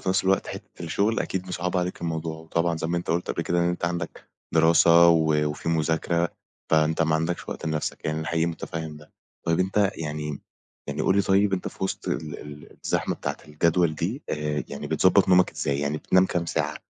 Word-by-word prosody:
في - - -4
نفس 95 0 +2
الوقت 95 +1 +2
حتة - - -9
الشغل 100 +7 0
أكيد 95 -1 -3
مصعّبة 90 0 -1
عليك 90 +1 -4
الموضوع، 80 -1 -3
وطبعًا 85 +1 -1
زي 80 - -3
ما 85 - -1
أنت 85 - -3
قُلت 85 +2 0
قبل - - -2
كده 85 - 0
إن - - +2
أنت 90 0 -2
عندك 85 0 -4 0.2
دراسة، 85 +1 +6
و 80 -2 +4 0.2
وفي 75 +2 -5
مذاكرة 80 +1 +1 0.4
فأنت 80 +1 +3
ما 80 -1 +2
عندكش 80 +2 -2
وقت - - -5
لنفسك، 80 -1 -3
يعني 75 0 -1
أنا 80 - -4
حقيقي 85 0 +1
متفهّم 80 -2 -5
ده، 75 0 -16 0.3
طيب 85 +1 +2
أنت 95 +1 +2
يعني 75 -2 -4 0.5
يعني - - -2
قُل 95 - +3
لي 100 - +4
طيب 100 +1 +3
أنت 95 - -1
في - - -5
وسط 95 - -4
ال 75 -2 -3
ال 75 0 -11
الزحمة - - 0
بتاعة - - -4
الجدول 85 +2 +2
دي 100 - -3
آآ، 75 0 -2
يعني 70 - -6
بتضبّط - - +4
نومك 90 0 +5
إزاي 70 0 -1
يعني 75 +1 -1
بتنام 95 +4 +3
كام 85 -2 -2
ساعة - - -1
85 Hz, 205 wpm, -25 LUFS, 80-90 Hz, 0.5 s, دراسة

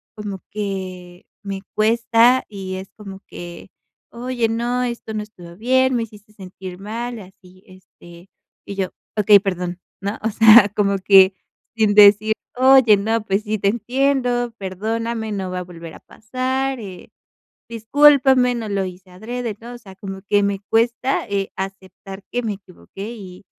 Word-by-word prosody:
como 205 -3 -6
que 185 -3 -6 0.2
me 195 -1 -5
cuesta 230 +3 +3
y 190 -2 -6
es 190 +1 -8
como 195 -2 -10
que: 175 +1 -10 0.4
"Oye, 240 -1 -2
no, 240 +2 -1
esto 235 -2 -5
no 210 -1 -3
estuvo 175 -5 -14
bien, 260 +2 +2
me 230 - 0
hiciste 210 -1 -14
sentir 185 -2 -10
mal" 230 +4 -5
y - - -9
así, 185 0 -18
este 180 -1 -17 0.4
y 200 - -6
yo: 190 -2 -2 0.3
"Okey, 205 -1 +6
perdón, 180 -2 -4 0.2
¿no?", 200 +2 -3
o 225 - +1
sea, 220 -1 +7
como 200 -1 +1
que 190 0 +6 0.4
sin 215 -2 +2
decir: 210 +1 +7 0.2
"Oye, 260 -5 +6
no, 220 +2 -1
pues 195 +1 0
sí, 215 0 -2
te 200 - +2
entiendo, 245 +1 0
perdóname, 220 +4 -3
no 190 -2 -3
va 180 - -3
a - - -5
volver 170 -2 -11
a - - -13
pasar, 260 +3 -3
eh, 190 -4 -10 0.6
discúlpame, 255 +1 +4
no 225 -2 -5
lo 200 -1 -1
hice 185 0 -10
adrede", 225 +3 -5
¿no? 240 +1 -9
O - - -9
sea, 195 -4 -14
como 195 0 -8
que 205 0 +3
me 200 -1 -1
cuesta, 235 +3 +1
eh, 195 -1 -2
aceptar 195 0 -8
que 245 0 -2
me 215 -2 -2
equivoqué 195 +2 -11
y 190 -3 -12
210 Hz, 165 wpm, -20 LUFS, 190-235 Hz, 0.6 s, sea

